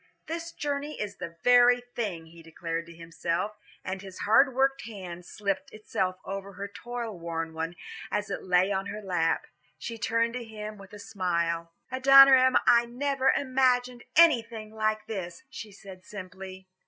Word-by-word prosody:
"This 330 +1 -5
journey 290 0 -4
is 205 -1 -4
the 170 0 -7
very 245 0 +6 0.2
thing," 185 -8 -3
he 165 +1 -15
declared 165 +1 -5
to - - -11
himself, 170 +4 -3 0.3
and 190 0 -4
his 190 -2 -10
hard 255 +5 +4
worked 270 +1 +2
hand 180 -5 -8
slipped 195 -2 -3
itself 190 -3 -2
over 195 0 -6
her 200 +2 -6
toil 230 0 -6
worn 165 -1 -4
one 165 +2 -4 0.3
as 210 -1 -2
it - - -3
lay 185 +1 +3
on 195 0 -1
her 210 +1 -6
lap. 175 -4 0 0.3
She 230 -1 -6
turned 230 +1 +1
to 250 -1 -4
him 215 -2 -8
with 195 -1 -13
a - - -8
smile. 170 -5 -2 0.2
"Adoniram, 265 0 +7
I 235 0 +6
never 270 +2 0
imagined 255 -2 +1
anything 230 -9 +4
like 215 0 -1
this," 180 -5 -6
she 215 - -8
said 190 -2 -12
simply. 190 -1 -9
205 Hz, 160 wpm, -28 LUFS, 180-245 Hz, 0.3 s, Adoniram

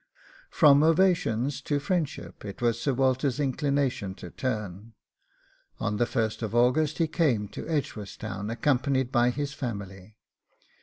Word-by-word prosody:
From 145 -1 +6
ovations 160 - +2
to 145 +1 -1
friendship 155 -1 -3
it 100 +1 -7
was 120 -1 0
Sir 140 - +1
Walter's 130 +1 +1
inclination 140 -7 0
to 90 - -10
turn. 105 -3 -4 0.9
On 105 -2 -1
the 120 - +2
1st 110 -1 -2
August 130 +6 +3
he 165 - +2
came 135 - +1
to - - -7
Edgeworthstown, 105 -8 -4
accompanied 130 +1 +1
by 120 -1 +3
his 140 +2 -3
family. 100 -5 -6
125 Hz, 125 wpm, -27 LUFS, 110-145 Hz, 0.9 s, From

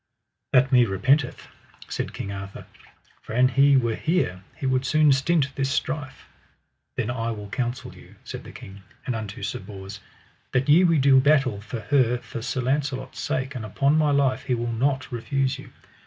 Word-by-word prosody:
That 130 0 +4
me 125 -2 +6
repenteth, 125 +8 +1 0.4
said - - -4
King 100 - -6
Arthur, 100 0 -7 0.6
for - - -9
an 125 +2 +4
he 140 +2 +5
were 120 -3 +1
here 155 - -1
he - - -5
would 130 0 +1
soon 150 +2 +4
stint 140 +1 +2
this 135 -1 -1
strife. 135 -1 -3 0.7
Then 120 - -1
I 115 -2 -2
will 105 -3 -6
counsel 120 +2 -3
you, - - -16
said - - -7
the - - -11
king, 95 +1 -11 0.2
and 125 - -1
unto 105 -3 -6
Sir - - -3
Bors: 95 +1 -9 0.5
That 125 +1 +1
ye 165 +5 +7
will 165 -3 +4
do 135 -1 +6
battle 135 -7 +2
for 110 +2 -6
her 125 -2 +2
for 120 -1 -8
Sir 130 +2 -2
Launcelot's 130 0 -2
sake, 130 +1 -2
and 125 -4 -5
upon 140 +8 +1
my 155 -1 +3
life 135 -2 +1
he 130 -2 +1
will 120 0 -3
not 130 +3 0
refuse 135 +2 -1
you. - - -11
130 Hz, 185 wpm, -24 LUFS, 115-140 Hz, 0.7 s, ye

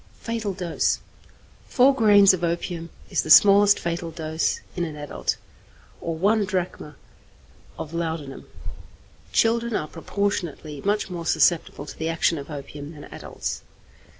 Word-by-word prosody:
Fatal 225 -3 -3
Dose. 180 -3 0 0.7
Four 270 +1 +5
grains 205 -6 +6
of 180 -2 -3
opium 170 0 -2 0.2
is - - +2
the - - -7
smallest 200 +4 +7
fatal 170 0 -3
dose 160 0 -2 0.2
in 175 - -1
an 160 -3 -4
adult, 145 -1 -3 0.6
or 165 -1 -3
one 205 +6 +2
drachm 180 -6 -3 0.8
of 160 - -7
laudanum; 160 -5 -4 0.8
children 230 0 +2
are 150 - -1
proportionately 165 -4 -3
much 205 -1 0
more 170 -2 -5
susceptible 165 -4 +2
to - - -9
the 160 +1 -3
action 165 -1 +1
of 140 - -9
opium 145 +1 -8
than 145 -2 -11
adults. - - -5
170 Hz, 135 wpm, -24 LUFS, 160-200 Hz, 0.8 s, smallest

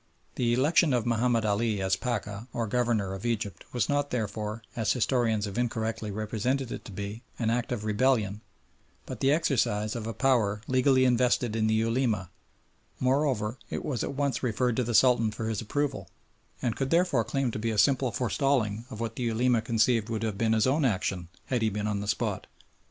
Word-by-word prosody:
The 120 -2 0
election 145 +3 +3
of 120 -3 +1
Mahomed 115 -1 +1
Ali 105 0 +1
as 95 0 +1
Pacha, 105 -1 -4
or 115 -1 -1
Governor, 110 -4 0
of 95 - -7
Egypt 110 -5 -3
was 120 -5 0
not 145 0 0
therefore, 110 -1 -3
as 110 -3 +1
historians 115 -4 +1
have 100 +3 -4
incorrectly 110 -2 -2
represented 110 +5 -2
it - - -6
to - - -9
be, 100 +3 -6 0.2
an 115 -2 0
act 120 +1 -1
of 110 -3 -3
rebellion, 110 -2 +1 0.6
but - - -7
the 135 - +3
exercise 120 -9 +1
of 115 -2 -4
a 115 - -3
power 110 -7 +2
legally 130 0 +3
invested 125 -2 +2
in 110 -1 +1
the 110 - +2
Ulema; 110 -4 0 0.7
moreover, 130 -4 +1
it - - -4
was 130 -6 -2
at - - -4
once 140 -1 0
referred 125 0 0
to 125 - +2
the 120 0 -1
Sultan 115 -1 +5
for 110 +1 -4
his 110 -2 -2
approval, 145 +6 -2 0.5
and 120 -3 0
could 135 -1 -2
therefore 165 -7 +3
claim 135 0 -1
to 110 - -4
be 115 +1 -1
a 110 - -2
simple 130 +1 +3
forestalling 120 -2 0
of 110 - -8
what 115 -1 -3
the 125 - -2
Ulema 115 +1 +2
conceived 115 0 +1
would 115 -1 -2
have 110 -3 -1
been 110 +2 +1
his 110 -1 +3
own 140 +4 +2
action 95 -6 0 0.2
had 125 -3 -1
he 110 - +2
been 105 0 -3
on 105 -1 -1
the 100 - -5
spot. - - -1
115 Hz, 195 wpm, -28 LUFS, 105-125 Hz, 0.7 s, Sultan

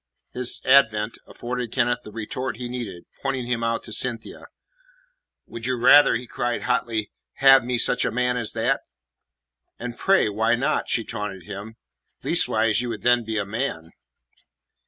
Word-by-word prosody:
His 125 -1 +2
advent 110 -5 +3
afforded 125 -1 -5
Kenneth 120 -1 +1
the 105 - -11
retort 115 +2 -5
he 125 0 -5
needed. 115 -8 -6 0.2
Pointing 135 -3 -2
him 120 -1 -2
out 115 0 -1
to 110 - -9
Cynthia: 115 0 -3 1.0
"Would 115 +1 -7
you 130 -1 0
rather," 145 +5 +7
he 125 - -4
cried 120 0 -3
hotly, 115 -4 -1 0.2
"have 135 -1 +6
me 125 0 -1
such 125 +1 +3
a - - +1
man 125 0 0
as 115 -3 -3
that?" 115 0 0 1.0
"And, 120 -1 -6
pray, 195 - +3
why 110 +3 +1
not?" 140 +5 -1
she 115 - 0
taunted 105 -5 -6
him. 100 +6 -8 0.5
"Leastways, 110 +1 +2
you 125 - -4
would 110 -2 -6
then 120 -1 +3
be 110 0 -3
a 100 - -1
man." 100 -7 -4
120 Hz, 160 wpm, -23 LUFS, 110-125 Hz, 1.0 s, rather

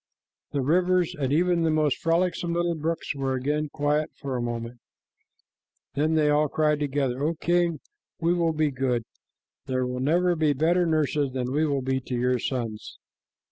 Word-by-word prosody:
The 140 - -1
rivers 180 +3 +2
and 135 -3 -2
even 175 +3 +2
the 165 - +2
most 155 -3 +1
frolicsome 170 +1 0
little 175 0 +1
brooks 165 +1 -2
were 135 -2 -1
again 150 +4 -1
quiet 150 +1 0
for 135 -2 -4
a 125 - -1
moment. 120 0 -4 1.1
Then 155 +3 +1
they 155 -1 +3
all 150 +1 +3
cried 150 0 +1
together, 135 -3 -1
"O 165 +3 0
king, 170 -1 +1 0.4
we 170 +1 +2
will 170 -2 +1
be 155 -1 +1
good. 130 -3 -1 0.6
There 130 -1 0
were 125 0 -3
never 175 +6 +2
better 160 +3 +2
nurses 150 -3 +1
than 125 -1 -2
we 155 +2 +2
will 140 -2 -1
be 130 0 0
to 125 0 -5
your 125 +1 +1
sons." 115 -4 -4
150 Hz, 170 wpm, -26 LUFS, 130-165 Hz, 1.1 s, they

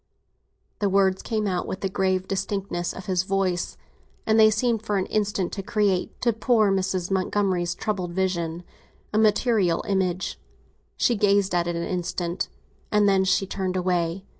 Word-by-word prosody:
'" - - -46
The 205 - +1
words 190 -1 +2
came 215 -2 -2
out 185 -3 -1
with 190 - -5
the 195 - 0
grave 190 -1 0
distinctness 195 -2 -2
of 185 - -9
his 185 -2 +1
voice, 185 -2 -1 0.5
and 220 0 +3
they 215 0 +8
seemed 225 +1 +1
for 210 -2 -1
an 190 - 0
instant 205 -4 -1
to 200 - -4
create, 200 -2 0
to 235 -2 +2
poor 220 -2 +3
Mrs. 190 -1 -1
Montgomery's 185 -2 0
troubled 185 -4 -3
vision, 175 -2 -1 0.5
a 215 - +3
material 210 -5 +2
image. 190 -2 -1 0.6
She 240 - +2
gazed 200 -2 +2
at 175 -1 +1
it 175 - -1
an 170 - -2
instant, 175 0 -3 0.4
and 210 -1 +4
then 195 -1 +4
she 190 +1 +2
turned 190 -1 -2
away. 180 0 -1
190 Hz, 165 wpm, -25 LUFS, 180-205 Hz, 0.6 s, they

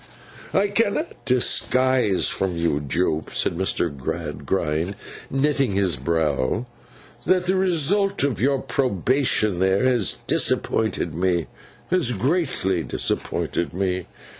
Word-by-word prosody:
'I 200 +1 +2
cannot 225 +9 -1
disguise 130 -3 +2
from 95 -3 0
you, 85 -3 0
Jupe,' 80 +2 -1
said - - -1
Mr. 85 -4 0
Gradgrind, 80 +4 -2 0.3
knitting 135 -4 +1
his 95 -4 +2
brow, 75 - -1 0.6
'that 185 0 +3
the 185 +1 +2
result 190 +2 +2
of 135 -7 0
your 135 +2 +3
probation 125 - +1
there 95 +3 +2
has 125 -6 +2
disappointed 110 -6 0
me; 85 -1 0 0.5
has 175 -9 +2
greatly 125 - 0
disappointed 85 +1 -2
me. 95 -2 -1
100 Hz, 110 wpm, -23 LUFS, 85-140 Hz, 0.6 s, that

